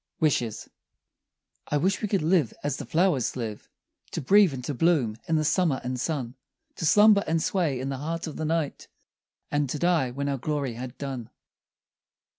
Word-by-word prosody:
WISHES 120 -8 0 1.0
I 145 - +1
wish 190 +7 +1
we 210 - 0
could 195 -4 0
live 160 - +2
as 145 -1 -1
the - - -7
flowers 165 -7 +1
live, 110 -4 -5 0.4
To - - -2
breathe 195 +5 +5
and 125 -2 -6
to 145 - -2
bloom 140 -7 +2
in 165 - +1
the 155 -1 +1
summer 160 -4 +2
and 125 0 -3
sun; 130 -4 -2 0.4
To 165 - 0
slumber 210 +2 +6
and 165 +1 +1
sway 160 -7 0
in 130 +2 -3
the 135 - -3
heart 165 +3 -3
of 155 - -6
the - - -4
night, 160 -2 -2 0.6
And 145 -2 0
to 150 - -2
die 165 -5 +2
when 140 +3 -3
our 140 -1 -1
glory 140 -2 -2
had 125 +2 -7
done. 130 -5 -5
145 Hz, 185 wpm, -26 LUFS, 130-165 Hz, 1.0 s, slumber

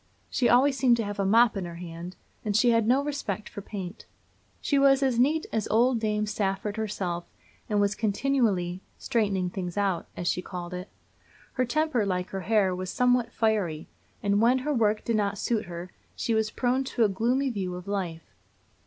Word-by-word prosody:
She 245 - +2
always 265 +3 +5
seemed 250 -3 +4
to 230 - -1
have 205 -1 -5
a 195 - +1
mop 225 +3 +5
in 195 -2 -3
her 170 -1 -7
hand, 170 +1 -8 0.3
and 210 -1 +1
she 240 +2 +4
had 230 -2 +2
no 260 +4 +3
respect 275 -9 -3
for 200 - -8
paint. 195 -2 -7 0.5
She 280 - +1
was 275 0 +5
as 255 -3 +1
neat 305 +5 +3
as 220 -2 0
old 235 +2 +3
Dame 210 -1 0
Safford 205 0 -2
herself, 190 -6 -3 0.4
and 210 -1 +2
was 205 0 +2
continually 210 -5 0 0.2
"straightening 200 -7 0
things 180 -1 -5
out," 195 -4 0
as 175 - -3
she 180 - +1
called 180 -1 -7
it. 180 +2 -6 0.6
Her 255 - +1
temper, 305 -2 +1
like 180 -2 -1
her 195 - -3
hair, 200 -1 +2
was 185 0 -4
somewhat 245 +1 +2
fiery; 200 -9 0 0.4
and 205 0 +2
when 240 +3 +5
her 300 - +1
work 215 -4 +1
did 230 -2 +1
not 200 -1 0
suit 220 +2 -1
her, 175 +1 -7 0.2
she 230 - -1
was 220 -1 +1
prone 250 +3 0
to 245 -2 +1
a - - +5
gloomy 245 +7 0
view 185 -5 -3
of 180 +1 -9
life. 180 -5 -3
210 Hz, 195 wpm, -27 LUFS, 185-240 Hz, 0.6 s, always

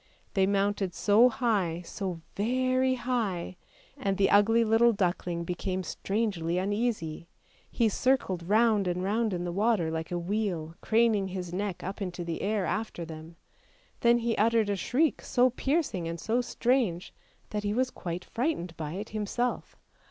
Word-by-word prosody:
They 190 -1 +3
mounted 200 -2 0
so 220 +4 +5
high, 205 -9 0
so 180 -2 -5
very 255 +4 +1
high, 225 -9 -2 0.4
and 200 -9 -1
the 195 -1 +3
ugly 225 +3 +5
little 230 +1 +4
duckling 175 -3 -1
became 185 +2 -3
strangely 195 -3 -1
uneasy, 195 -5 -2 0.4
he 230 - +2
circled 220 -5 +1
round 215 -2 +4
and 180 +1 -1
round 215 +3 +1
in 175 -1 -2
the 175 - -3
water 200 -3 +1
like 160 0 -3
a 175 - -1
wheel, 175 -3 -2
craning 220 -3 +2
his 180 -2 -5
neck 195 -1 -3
up 195 +3 -5
into 180 -2 -4
the 170 -1 -4
air 205 -2 0
after 215 -6 -3
them. 160 +1 -10 0.6
Then 235 0 +5
he 235 -1 0
uttered 220 -1 +3
a - - +1
shriek 275 - +1
so 250 0 +3
piercing 265 - -1
and 165 0 -4
so 230 +6 +1
strange, 240 -8 0 0.4
that 210 - -1
he 205 0 -1
was 255 +1 +1
quite 175 0 -5
frightened 225 - -2
by 155 -1 -4
it 205 +4 -5
himself. 220 +3 -2
205 Hz, 160 wpm, -29 LUFS, 175-230 Hz, 0.6 s, so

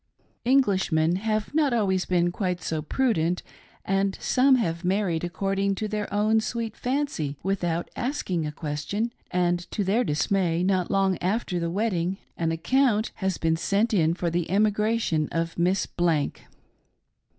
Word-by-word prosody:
Englishmen 190 -10 +3
have 215 +3 -2
not 295 -4 +2
always 190 -5 +1
been 175 -1 +2
quite 180 -1 -2
so 160 -2 -3
prudent, 180 - 0 0.4
and 195 0 0
some 265 +1 +4
have 170 -8 -1
married 180 -3 0
a<;cording 195 +2 -1
to 215 +3 -3
their 210 -1 -3
own 215 +2 +3
sweet 225 0 -3
fancy 250 - -2
without 175 -3 -1
asking 240 - -2
a - - -3
question, 155 +10 -3 0.2
and 175 -1 0
to 210 - -2
their 205 +6 +2
dismay, 175 0 +1
not 185 -2 +1
long 195 -2 +2
after 190 -1 -1
the 170 0 -1
wedding, 185 -2 -1 0.2
an 165 -1 -1
account 220 +6 +2
has 190 -3 -1
been 160 0 +1
sent 200 +7 +1
in 165 -4 +3
for 175 -1 -2
the 170 0 -1
emigration 210 -4 +1
of 165 0 -2
Miss 180 +3 +2
Blank. 165 -5 -1
190 Hz, 150 wpm, -26 LUFS, 170-215 Hz, 0.4 s, some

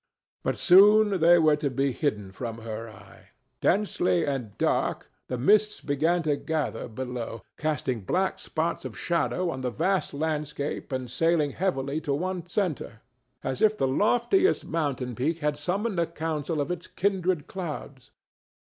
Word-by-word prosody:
But - - -1
soon 205 +2 +6
they 170 +1 +7
were 155 -3 +4
to 145 -1 -1
be 135 +1 0
hidden 105 -8 -2
from 115 +3 -6
her 115 0 -6
eye. 110 - -16 0.3
Densely 180 -3 +2
and 130 -7 -3
dark - - 0 0.2
the 125 - -3
mists 210 - +3
began 160 +5 +1
to 150 -2 +2
gather 155 -8 -2
below, 120 -1 -5 0.2
casting 135 -6 -1
black 185 - 0
spots 165 +1 -2
of 120 -6 -7
shadow 170 +6 0
on 130 - -5
the 125 - -1
vast 180 +5 0
landscape 150 -1 -3
and 130 -1 -2
sailing 155 +3 +1
heavily 150 -4 -1
to 145 -3 -1
one 180 +2 -3
centre, 165 - -2 0.4
as 130 -1 -3
if 215 0 +4
the - - +1
loftiest 245 - +2
mountain 140 -6 -2
peak 145 +8 -1
had 150 -2 0
summoned 185 +6 -1
a 170 - +2
council 160 -1 -3
of 145 - -2
its 175 -1 -5
kindred 185 -5 0
clouds. 150 -7 -7
155 Hz, 155 wpm, -27 LUFS, 130-180 Hz, 0.4 s, they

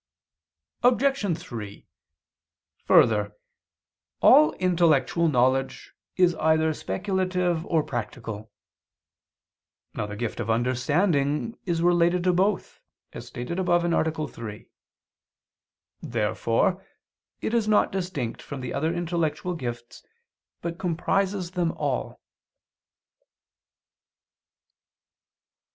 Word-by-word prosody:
Obj. 245 - +2
3: 105 -4 -8 1.0
Further, 105 -2 +4 0.8
all 150 - +7
intellectual 170 -3 +2
knowledge 130 -1 0 0.2
is 180 -2 +4
either 160 0 +2
speculative 180 -2 -1
or 160 -2 +2
practical. 110 -3 -6 1.4
Now 105 - -3
the 105 - -6
gift 115 +1 -4
of - - -3
understanding 140 - +1
is 170 -1 0
related 175 0 +3
to 180 0 +3
both, 190 +2 0 0.3
as - - -8
stated 125 +9 -5
above 175 -2 +2
(A. 160 -2 0
3). 110 -5 -9 1.3
Therefore 115 - 0 0.6
it 220 - -3
is 230 -2 +1
not 215 -1 +3
distinct 180 -11 -3
from 140 -2 -7
the 125 - -5
other 155 +4 0
intellectual 170 0 -2
gifts, 120 -6 -7 0.6
but 170 0 -4
comprises 185 +1 -1
them 175 -3 0
all. 140 -4 -3
165 Hz, 90 wpm, -25 LUFS, 125-180 Hz, 1.4 s, all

